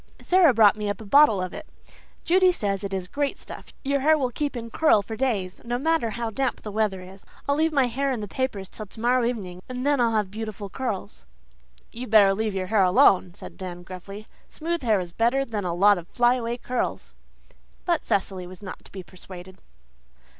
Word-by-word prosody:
Sara 360 -4 +4
brought 220 -4 +5
me 210 -1 -3
up 205 - -3
a 220 - -9
bottle 275 -2 +5
of 185 - -5
it. - - -8 0.6
Judy 365 +1 +4
says 200 - -2
it 200 - -4
is 190 -2 -3
great 285 +7 -2
stuff - - -10
your 280 +1 +1
hair 310 +3 +4
will 255 -4 -1
keep 285 +1 -3
in 230 -1 -7
curl 260 -9 +3
for 220 +3 -6
days, 210 -7 -2
no 240 +1 -2
matter 320 -3 +1
how 230 0 -4
damp 265 +4 -2
the 210 - -6
weather 205 -3 -1
is. 190 +2 -13 0.2
I'll 280 - +3
leave 320 +2 +2
my 275 -4 +3
hair 270 +3 -1
in 250 - -2
the 210 - -5
papers 205 -4 -3
till 215 +2 -9
tomorrow 240 +4 0
evening, 195 -7 -3
and 255 +1 -4
then 285 -3 +2
I'll 230 -1 +2
have 210 -3 0
beautiful 215 -2 -6
curls." 215 -5 -5 0.6
"You'd 245 +1 -7
better 205 -3 +6
leave 215 0 -2
your 185 -1 -2
hair 210 +2 +2
alone," 180 -1 +4
said - - -10
Dan 175 -2 -7
gruffly. 195 +3 -9 0.2
"Smooth 335 +1 -3
hair 220 -5 +2
is 175 -2 -6
better 240 +8 +1
than 210 -6 -4
a 170 -1 -1
lot 200 +1 +5
of 170 - -12
fly 240 +3 +3
away 240 -1 -3
curls." 250 0 -3 0.7
But 340 -3 +1
Cecily 190 -3 -1
was 185 +2 -12
not 190 - -8
to - - -15
be 190 -2 -8
persuaded. 185 +2 -12
220 Hz, 210 wpm, -25 LUFS, 195-255 Hz, 0.7 s, better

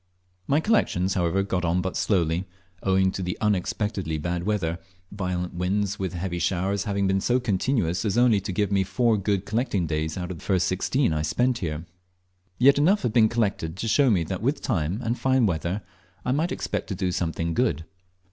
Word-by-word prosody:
My 145 - +3
collections, 95 - +1
however, 90 +1 +1
got 95 -2 -2
on 85 +1 +1
but 95 0 -3
slowly, 90 -1 +1 0.3
owing 95 0 +2
to 95 - -5
the 90 0 -3
unexpectedly 100 -4 -1
bad 85 +3 -3
weather, 90 -6 -1 0.3
violent 90 -3 -3
winds 100 +3 -1
with 95 -1 -2
heavy 85 0 -3
showers 95 +3 0
having 100 -1 0
been 95 0 +1
so 125 +5 +2
continuous 105 -5 0
as 105 0 0
only 120 -5 +4
to 100 - -4
give 100 +2 0
me 100 -1 +3
four 110 +4 +2
good 100 -1 -1
collecting 110 -4 0
days 80 +1 -2
out 90 0 -4
of 85 - -7
the - - -14
first 95 -3 +1
sixteen 95 - +1
I 75 - 0
spent 120 - +1
here. 80 -1 -4 0.7
Yet 140 +3 +5
enough 195 +7 +3
had 115 - 0
been 110 -2 +5
collected 100 -7 -1
to 115 - -3
show 135 +4 +4
me 95 -7 +3
that 90 +3 -4
with 135 +6 0
time 85 +7 -1
and 115 +1 -1
fine 130 -2 +3
weather 90 +2 -1 0.4
I 125 - +1
might 155 +6 0
expect - - -3
to 100 - -3
do 90 0 -1
something 85 -1 -2
good. 80 - 0
95 Hz, 195 wpm, -25 LUFS, 90-110 Hz, 0.7 s, Yet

